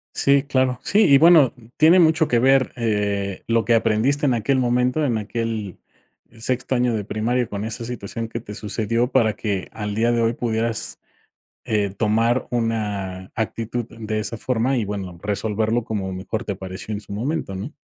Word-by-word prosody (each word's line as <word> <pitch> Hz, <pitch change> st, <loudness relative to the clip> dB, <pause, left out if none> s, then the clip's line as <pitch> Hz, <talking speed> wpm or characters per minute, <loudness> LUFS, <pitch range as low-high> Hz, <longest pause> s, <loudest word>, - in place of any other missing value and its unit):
Sí, 140 Hz, 0 st, +3 dB
claro. 130 Hz, -2 st, 0 dB
Sí, 210 Hz, +3 st, +3 dB
y 140 Hz, -1 st, +7 dB
bueno, 160 Hz, -4 st, +6 dB, 0.2 s
tiene 165 Hz, +4 st, +6 dB
mucho 160 Hz, -2 st, +4 dB
que 120 Hz, -, +2 dB
ver, 135 Hz, +1 st, +3 dB
eh, 100 Hz, -4 st, -1 dB
lo 115 Hz, 0 st, +2 dB
que 120 Hz, -, +3 dB
aprendiste 115 Hz, +7 st, +2 dB
en 130 Hz, -, +3 dB
aquel 130 Hz, +4 st, +1 dB
momento, 125 Hz, +4 st, +1 dB
en 120 Hz, -4 st, +1 dB
aquel 110 Hz, -2 st, -4 dB, 0.6 s
sexto 130 Hz, +2 st, -1 dB
año 120 Hz, -2 st, +1 dB
de 105 Hz, -2 st, -3 dB
primaria 120 Hz, +3 st, -1 dB
con 100 Hz, 0 st, -5 dB
esa 115 Hz, +1 st, -3 dB
situación 115 Hz, -1 st, -5 dB
que 115 Hz, -, -5 dB
te 105 Hz, -2 st, -9 dB
sucedió 115 Hz, +3 st, -1 dB
para 110 Hz, -5 st, +3 dB
que 100 Hz, -4 st, -3 dB
al 105 Hz, -1 st, -4 dB
día 115 Hz, +2 st, +2 dB
de 120 Hz, -1 st, +1 dB
hoy 115 Hz, +1 st, +2 dB
pudieras, 115 Hz, -1 st, -1 dB, 0.7 s
eh, 105 Hz, -2 st, +1 dB
tomar 115 Hz, +3 st, +1 dB
una 105 Hz, -6 st, -2 dB
actitud 115 Hz, +1 st, -3 dB
de 110 Hz, -1 st, -4 dB
esa 115 Hz, +1 st, -3 dB
forma 125 Hz, +3 st, 0 dB
y, 110 Hz, -, 0 dB
bueno, 95 Hz, -4 st, -5 dB
resolverlo 110 Hz, +3 st, 0 dB
como 100 Hz, -4 st, -3 dB
mejor 105 Hz, +5 st, -4 dB
te -, -, -2 dB
apareció 95 Hz, +2 st, -6 dB
en 105 Hz, -, -4 dB
su 100 Hz, -, -12 dB
momento, 115 Hz, -2 st, -3 dB
¿no? 120 Hz, +11 st, -6 dB
115 Hz, 180 wpm, -22 LUFS, 105-125 Hz, 0.7 s, y